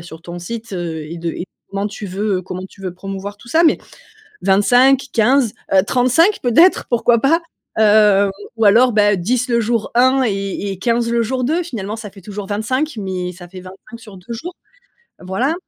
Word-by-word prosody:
a - - -10
sur 165 -1 -11
ton 175 0 -8
site. 225 +4 -7
Heu, 165 -4 -4
et 170 - -7
de 170 0 -3
et - - -8
de 175 - -3 0.3
comment 200 +1 -2
tu 210 0 -7
veux, 195 +1 -1
heu, 185 - -6
comment 185 0 -6
tu 195 - -19
veux 185 -2 -5
promouvoir 195 +2 -7
tout 220 - -18
ça. 320 +7 +2
Mais 320 - +4 0.6
25, 245 +7 +4
15 240 0 +3 0.2
heu, 190 - +6
35 260 - +3
peut-être, 325 +10 +4
pourquoi 240 -1 +3
pas? 330 +5 +2 0.4
Heu, 210 -2 +5 0.3
ou 225 - +1
alors 235 +4 +5
beh, 205 -1 +3
10 250 +7 0
le 235 0 +2
jour 230 -1 -1
1, 260 +2 +4
et 200 -1 -3
et 190 - -8
15 235 +3 0
le 235 0 +1
jour 255 +2 -2
2. 325 +7 0
Finalement 215 - -5
ça 215 -3 -8
fait 195 -2 -15
toujours 205 0 -7
25, 255 +9 -1
mais 185 -3 -4
ça 175 0 -12
fait 185 0 -10
25, 195 +5 -13
sur 215 -4 -13
2 190 +6 -10
jour, 340 +10 -7 0.7
voilà. 225 - -1
210 Hz, 205 wpm, -18 LUFS, 190-245 Hz, 0.7 s, heu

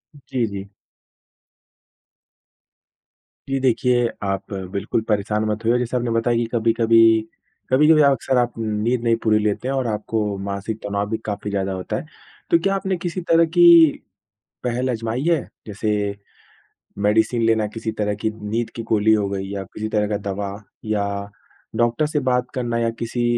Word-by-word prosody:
जी, 130 -4 -2
जी। 100 -1 -6 2.8
जी 135 0 0
देखिए, 125 -1 +2 0.2
आप 95 +1 -3 0.2
बिल्कुल 100 +3 -1
परेशान 105 +1 0
मत 105 +1 -3
होइए 120 +2 +3
जैसे 125 0 -2
आपने 120 -1 -1
बताया 115 +1 +1
कि 120 - +1
कभी-कभी, 115 -1 +4 0.5
कभी-कभी 150 +4 +5
अक्सर 135 -2 +2
आप 120 -1 +1
नींद 110 +2 -1
नहीं 115 -1 +3
पूरी 110 -1 +4
लेते 105 +3 -1
हैं 135 - -1
और 130 -2 0
आपको 105 -1 -2
मानसिक 100 +2 -4
तनाव 100 0 -2
भी 110 - -1
काफ़ी 105 -1 -4
ज़्यादा 100 -1 -1
होता 95 -1 -4
है। - - -6 0.5
तो 170 - +6
क्या 195 +4 +1
आपने 190 -1 -1
किसी 175 +1 -4
तरह 165 0 +5
की 175 +2 +3 1.0
पहल 125 +1 -1
आज़माई 115 +1 -2
है? 165 -3 +3 0.3
जैसे 105 -1 -1 0.9
मेडिसिन 110 +3 +2
लेना 110 -1 +2
किसी 115 -1 -3
तरह 105 -1 0
की 110 - +1
नींद 110 +2 -3
की 115 - -4
गोली 110 0 +4
हो 105 -2 0
गई 95 -1 -3
या 100 -1 -4
किसी 110 +2 -6
तरह 105 -1 0
का 105 - -1
दवा 100 0 -3 0.3
या 105 -2 0 0.7
डॉक्टर 120 +6 +2
से 150 0 -1
बात 125 0 0
करना 120 -2 -1
या 115 0 +1
किसी 120 +1 -2
115 Hz, 160 wpm, -21 LUFS, 105-125 Hz, 2.8 s, तो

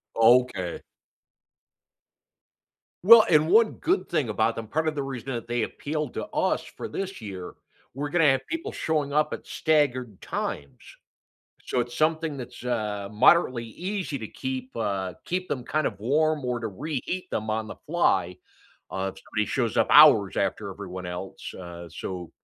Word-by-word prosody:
Okay. 115 -6 +3 2.2
Well, 225 +1 +10
and 155 -1 +4
one 220 +3 +5
good 370 +4 0
thing 155 -8 0
about 110 +2 +1
them, 115 - -5
part 160 +7 -1
of 155 - 0
the 140 - -2
reason 135 -1 -5
that 120 -1 -4
they 120 -1 -1
appealed 150 +3 -4
to - - -4
us - - 0
for - - -8
this 195 -2 -5
year, 95 -4 -7 0.4
we're 140 +3 -3
gonna 160 -3 +4
have 135 0 -1
people 330 0 -3
showing 150 -3 -1
up 150 +1 +1
at - - -7
staggered 130 - 0
times. 70 -2 -4 0.9
So, 125 - 0
it's 120 0 -4
something 155 -1 +1
that's, 125 -1 -9
uh, 105 -5 -2
moderately 125 +2 +4
easy 180 - -4
to 110 -3 -6
keep 130 0 -5
uh, 95 -5 -2
keep 185 +1 -2
them 125 -3 -3
kind 155 +3 0
of 100 - -11
warm 150 +6 +1
or 125 -1 -1
to 115 - -3
reheat 155 - -4
them 110 0 -2
on 110 0 -1
the - - -7
fly, 95 - +1 0.6
uh, 95 0 -2
if 95 - -15
somebody 110 -1 -1
shows 120 -5 -1
up - - +3
hours 115 - +7
after - - -1
everyone 90 0 -7
else, 90 +2 -6
uh, 85 -1 -9
so 90 +1 -6
125 Hz, 165 wpm, -26 LUFS, 105-155 Hz, 2.2 s, Well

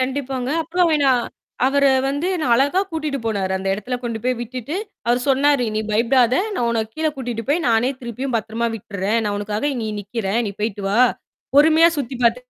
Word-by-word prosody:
கண்டிப்பாங்க. 260 -1 -2
அப்புறம் 345 +2 +1
வே 310 - +3
நான் 255 -3 +3 0.4
அவரே 280 +1 +2 0.2
வந்து 285 +5 -1
என்ன 315 -7 -1
அழகா 285 +9 +2
கூட்டிட்டு 310 -3 -3
போனாரு. 200 -4 -1
அந்த 190 +1 -3
இடத்துல 210 +5 -4
கொண்டு 230 -2 -3
போய் 255 0 +1
விட்டுட்டு, 250 +4 -5 0.3
அவரு 240 +1 +2
சொன்னாரு, 275 -1 +3
"நீ - - +1
பயப்படாத! 235 +3 +3 0.2
நான் 240 - 0
உன்ன 230 -1 0
கீழ 315 0 -1
கூட்டிட்டு 240 -3 -4
போய், 330 +4 +1
நானே 230 +2 +3
திருப்பியும் 250 +2 -4
பத்திரமா 225 +2 -2
விட்டிர்றேன். 200 +1 -2
நான் 205 -1 -1
உனக்காக 210 +3 -3
இங்க 235 -3 -3
நிக்கிறேன். 205 +1 -2
நீ - - -5
போயிட்டு 210 -2 -2
வா! 210 - +1 0.6
பொறுமையா 320 +3 +6
சுத்தி 265 -2 -3
பாத்து" 235 +1 +4
245 Hz, 180 wpm, -21 LUFS, 225-280 Hz, 0.6 s, பொறுமையா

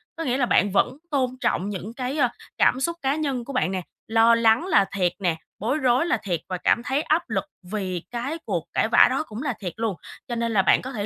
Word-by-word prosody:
có 330 - -4
nghĩa 255 -3 0
là 255 - +2
bạn 205 -4 +3
vẫn 200 +7 +1
tôn 265 -3 +1
trọng 205 -5 0
những 205 +2 -6
cái, 255 +3 -3
ơ, 250 -5 +3 0.3
cảm 255 - +4
xúc 335 +5 -1
cá 270 +1 +1
nhân 275 -6 -2
của 275 - -7
bạn 255 -7 +1
nè, 190 -1 -2 0.3
lo 225 +1 +5
lắng 230 +5 +3
là 200 - +4
thiệt 180 -3 +2
nè, 175 -4 +1 0.2
bối 240 +8 0
rối 255 +1 +2
là 345 - +1
thiệt 175 -5 -1
và 185 - -2
cảm 235 - +2
thấy 265 +4 0
áp 315 +2 0
lực - - 0 0.3
vì 185 -5 -3
cái 250 +7 -3
cuộc - - -2
cãi - - +2
vã - - +6
đó - - 0
cũng 220 +5 -6
là 280 -4 -1
thiệt 180 -5 -5
luôn. 225 -3 -1 0.3
Cho 240 - -3
nên 230 0 -1
là 205 -3 +4
bạn - - +4
có 260 - -6
thể 210 -6 -3
235 Hz, 255 wpm, -24 LUFS, 205-270 Hz, 0.3 s, vã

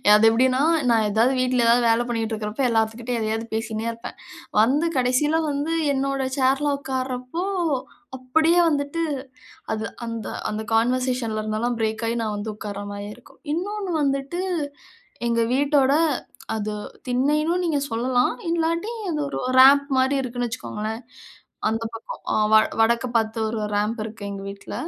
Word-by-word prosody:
அது 210 +1 +5
எப்பிடின்னா, 255 +3 +3 0.3
நான் 225 -2 +3
எதாவது 225 +5 +3
வீட்ல 255 -1 +2
எதாவது 235 +1 +4
வேல 230 +1 +3
பண்ணிக்கிட்டு 225 -1 -2
இருக்கிறப்ப, 215 +4 -3
எல்லாத்துக்கிட்டயும் 230 +1 0
எதையாவது 220 +1 -1
பேசின்னே 220 0 -2
இருப்பேன். 230 0 -9 0.4
வந்து 285 +9 +3
கடைசில 255 +5 +2
வந்து 290 +3 -1 0.2
என்னோட 275 0 -1
சேர்ல 275 +2 +2
உட்கார்றப்போ 260 +3 -3 0.7
அப்பிடியே 320 +7 +3
வந்துட்டு, 290 +2 -1 0.7
அது 220 0 -3 0.2
அந்த 230 -1 -5 0.2
அந்த 215 +1 -3
கான்வர்சேஷன்ல 245 -1 +1
இருந்தெல்லாம் 220 +3 -1
பிரேக் 220 +1 -1
ஆகி 235 +1 -1
நான் 215 -1 -2
வந்து 210 +1 -4
உட்கார்ற 205 -1 -6
மாரியே 205 +1 -6
இருக்கும். 245 - -20
இன்னொன்னு 390 +2 -3
வந்துட்டு, 275 +5 -1 0.9
எங்க 230 0 +1
வீட்டோட 280 0 +3 0.6
அது 215 0 -3 0.3
திண்ணைனும் 300 +8 +1
நீங்க 310 -4 +1
சொல்லலாம். 245 +2 +1 0.2
இல்லாட்டி 335 +5 0 0.2
அது 305 - -2
ஒரு - - -3 0.2
ரேம்ப் 280 +2 +7
மாரி 260 +2 +3
இருக்குன்னு 245 -1 -3
வச்சிக்கோங்களேன். 220 0 -5 0.7
அந்த 225 +1 -1
பக்கம் 225 0 -8
அ - - +1 0.2
வ 220 - +9 0.2
வடக்க 235 +2 +3
பார்த்து 225 0 0
ஒரு 220 0 -3
ரேம்ப் 210 +3 0
இருக்கு 220 -1 -8
எங்க 195 -1 -6
வீட்ல. 200 0 -8
245 Hz, 140 wpm, -23 LUFS, 220-275 Hz, 0.9 s, வ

